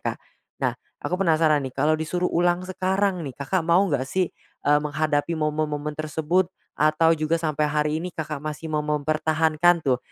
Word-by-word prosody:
Kak. - - -2 0.5
Nah, - - +2 0.3
aku - - -1
penasaran 160 -4 +3
nih, - - -16
kalau 150 +3 +3
disuruh 165 +3 -1
ulang 175 +1 +2
sekarang 190 0 0
nih, 140 -6 -6
Kakak 145 +7 -1
mau 170 +4 +3
nggak 140 -8 -1
sih, 185 +3 0 0.3
eee, 145 +1 +5
menghadapi 150 +2 0
momen-momen 150 -1 -1
tersebut 160 +4 0 0.3
atau 155 +2 +4
juga 155 0 0
sampai 155 -2 0
hari 150 0 +1
ini 180 - -4
Kakak 150 -2 -4
masih 155 +1 -5
mau 150 - +1
mempertahankan 155 +2 +2
tuh, 130 -2 +2
155 Hz, 165 wpm, -24 LUFS, 150-170 Hz, 0.5 s, eee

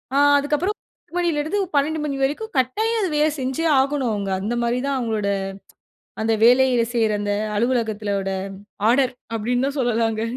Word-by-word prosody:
ஆ. - - +3 0.2
அதுக்கப்புறம் 300 +8 0
10 - - -34
மணிலேருந்து 335 +2 0 0.2
12 300 +2 +1
மணி 280 -2 -2
வரைக்கும் 330 +11 -2
கட்டாயம் 440 - 0
அது 375 - 0
வேலை 305 +1 +3
செஞ்சே 265 +5 -2
ஆகணும் 270 -3 0
அவங்க. 200 -2 -3
அந்த 225 +5 -2
மாதிரி 235 +1 0
தான் 275 - 0
அவங்களோட, 220 -4 -1 1.0
அந்த 225 0 +2
வேலையில 250 -1 +4
செய்ற 225 -2 +2
அந்த 205 0 -1 0.2
அலுவலகத்தோட 215 -4 -1 0.6
ஆர்டர், 255 0 +2 0.2
அப்படின்னு 245 +4 0
தான் 280 0 -5
சொல்லலாங்க. 225 -2 0
255 Hz, 150 wpm, -22 LUFS, 225-295 Hz, 1.0 s, வேலையில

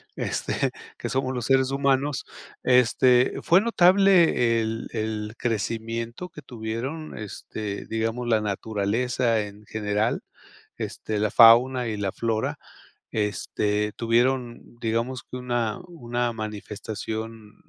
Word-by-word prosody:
este, - - -1 0.3
que - - -4
somos 130 0 -1
los 125 -3 -3
seres 135 0 +3
humanos, 140 0 +1 0.4
este, 125 0 +4
fue 175 - +6
notable 180 - +4
el 110 +1 -3
el 110 -1 -3
crecimiento 115 - -3
que 160 -3 -11
tuvieron, 125 +6 -5
este, 105 -1 -6
digamos, 115 +2 -2
la 110 -2 +3
naturaleza 110 +3 0
en 105 0 -9
general, 105 +1 -1 0.6
este, 110 -1 -4
la 105 0 +1
fauna 120 +2 +7
y 110 - -3
la 100 -2 -1
flora, 115 -2 -1 0.6
este, 105 0 -1
tuvieron, 120 +1 0
digamos, 115 +3 -1
que 125 - -8
una 120 -3 -1
una 120 -7 -2
manifestación, 110 0 -6
115 Hz, 110 wpm, -25 LUFS, 110-125 Hz, 0.6 s, fauna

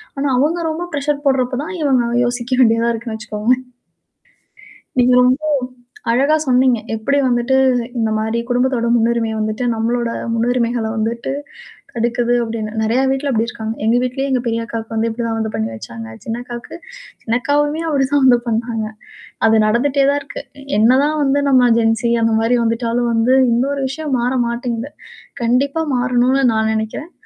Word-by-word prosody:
ஆனா, 280 +1 -1
அவுங்க 305 +6 +1
ரொம்ப 325 +3 -3
பிரஷர் 285 0 -2
போடுறப்ப 255 -2 +1
தான், 355 - -6
இவுங்க 260 -5 +2 0.2
யோசிக்க 245 +1 -2
வேண்டியதா 230 -1 +3
இருக்குன்னு 225 -1 -5
வச்சுக்கோங்களேன். 220 +4 -1 1.4
நீங்க 250 0 +4
ரொம்போ 255 +5 +2 0.7
அழகா 280 +6 +3
சொன்னீங்க. 250 -1 +3 0.2
எப்படி 280 +6 0
வந்துட்டு 240 +2 +1 0.4
இந்த 220 -1 +1
மாரி 220 +2 -1
குடும்பத்தோட 245 -1 +1
முன்னுரிமை 230 -1 +1
வந்துட்டு, 215 +3 -2
நம்மளோட 235 +1 -1 0.3
முன்னுரிமைகள 235 0 0
வந்துட்டு 230 +3 -2 0.6
தடுக்குது 240 +1 0
அப்படின்னு. 225 -2 -4
நெறைய 225 +3 +1
வீட்ல 270 +1 -1
அப்படி 225 -2 +1
இருக்காங்க. 220 -2 -5
எங்க 225 +2 +3
வீட்லேயே 255 +2 -2
எங்க 255 - +1
பெரிய 230 0 -1
அக்காவுக்கு 225 -1 -6
வந்து 225 +1 0
இப்படிதான் 230 0 -3
வந்து 220 0 -2
பண்ணி 110 - -1
வச்சாங்க. 115 0 -8 0.2
சின்னக்காவுக்கு 240 +3 -6 0.5
சின்னக்காவுமே 290 +6 0
அப்படி 280 -3 +1
தான் 285 -1 +3
வந்து 245 -2 +6
பண்ணாங்க. 225 -1 -1 0.6
அது 220 0 +4
நடந்துட்டே 270 +5 +2
தான் 285 - 0
இருக்கு. 280 - -8 0.4
என்னதான் 265 +7 +3
வந்து 280 +1 +2
நம்ம 255 -2 +5
ஜென்சி 225 0 +1
அந்த 225 0 +2
மாரி 240 +2 +2
வந்துட்டாலும் 235 +1 0
வந்து 230 +3 +3 0.2
இன்னொரு 275 +4 0
விஷயம் 295 0 -3
மாற 250 +2 0
மாட்டேங்குது. 235 +2 -3 0.5
கண்டிப்பா 275 +7 +1
மாறணும்ன்னு 250 +2 +2
நான் 220 0 +1
நெனைக்கிறன். 220 +9 -4
240 Hz, 145 wpm, -18 LUFS, 225-265 Hz, 1.4 s, வந்து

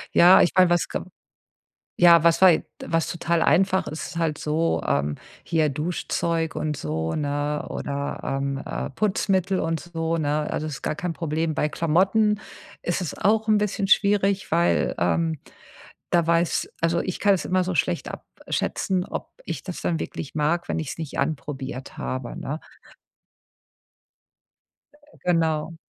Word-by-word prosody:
Ja, 180 +2 +8
ich - - +3
meine, 185 -1 +6
was 175 -1 +2
ge - - -3 1.0
ja, 170 -2 +8
was 170 0 +4
war 190 - +10
je 160 - +2 0.2
was 165 0 0
total 170 -1 0
einfach 190 0 +3
ist, 155 -1 -5
ist - - -6
halt 160 -3 0
so, 160 +2 0
ähm, 70 +1 0 0.3
hier 160 -2 +2
Duschzeug 165 +2 -2
und 150 -1 -2
so, 80 - -3
ne, 145 0 -1
oder, 140 0 -4
ähm, 135 0 -2
äh, - - -4
Putzmittel 195 +2 0
und 165 0 -1
so, 165 -1 -2
ne? 150 -1 0
Also, 155 - -2
das 150 - -4
ist - - -13
gar - - -1
kein 175 +2 -3
Problem. 160 0 -2
Bei 150 - +1
Klamotten 195 +7 +2 0.4
ist 175 - -1
es 180 - -5
auch 220 +2 +2
'n 215 - +5
bisschen 200 -1 -1
schwierig, 200 -1 +3
weil, 170 +1 +2
ähm, 165 -2 +1 0.7
da 170 -2 +3
weiß 170 0 +1
also, 165 +1 +2
ich 185 - -3
kann 205 -1 +5
es 185 - -3
immer 185 0 +1
so 185 0 -2
schlecht 85 - 0
abschätzen, 185 -2 -3
ob - - -6
ich - - -5
das 180 -3 -6
dann 165 -2 0
wirklich 145 - -6
mag, 170 +4 0
wenn - - -1
ich's 155 0 -5
nicht 160 -3 -6
anprobiert 140 -2 -4
habe, 130 -2 -4
ne? 150 +4 -4 2.7
Genau. 165 -2 +1
165 Hz, 160 wpm, -24 LUFS, 150-180 Hz, 2.7 s, war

